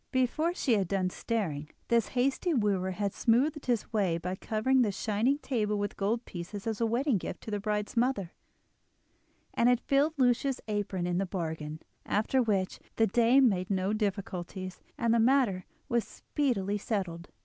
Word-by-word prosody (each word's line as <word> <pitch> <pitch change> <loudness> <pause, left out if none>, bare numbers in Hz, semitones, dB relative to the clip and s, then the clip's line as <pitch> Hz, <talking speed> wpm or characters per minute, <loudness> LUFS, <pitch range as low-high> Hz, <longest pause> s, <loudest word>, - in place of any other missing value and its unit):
Before 305 +7 +1
she 260 - +1
had 200 -4 +2
done 185 -1 0
staring, 165 -12 -2 0.2
this 235 -2 +3
hasty 275 +6 +1
wooer 200 -5 +1
had 200 +1 -2
smoothed 275 +6 +1
his 235 -3 0
way 190 -6 +2
by 180 +2 -3
covering 225 +7 +1
the 215 -4 +2
shining 220 +7 +1
table 215 -8 -1
with 205 0 -2
gold 225 +4 -1
pieces 190 +3 -7
as 225 -1 -2
a 230 - +3
wedding 240 0 +1
gift 175 - -6
to 220 - -7
the 205 - -1
bride's 210 +1 -2
mother, 230 -7 +1 1.2
and 235 - +3
had 245 -1 +4
filled 285 +5 +2
Lucia's 255 +1 +2
apron 205 -4 -2
into 175 0 0
the 195 - 0
bargain; 160 -4 -4 0.2
after 220 +5 +1
which 200 -5 0 0.2
the 225 - +4
dame 240 +5 +5
made 185 -4 0
no 190 +1 0
difficulties, 190 -3 -3 0.2
and 235 -1 +2
the 235 - +4
matter 230 -7 +3 0.2
was 235 -1 +1
speedily 210 -9 -1
settled. 180 -6 -3
210 Hz, 170 wpm, -30 LUFS, 190-245 Hz, 1.2 s, dame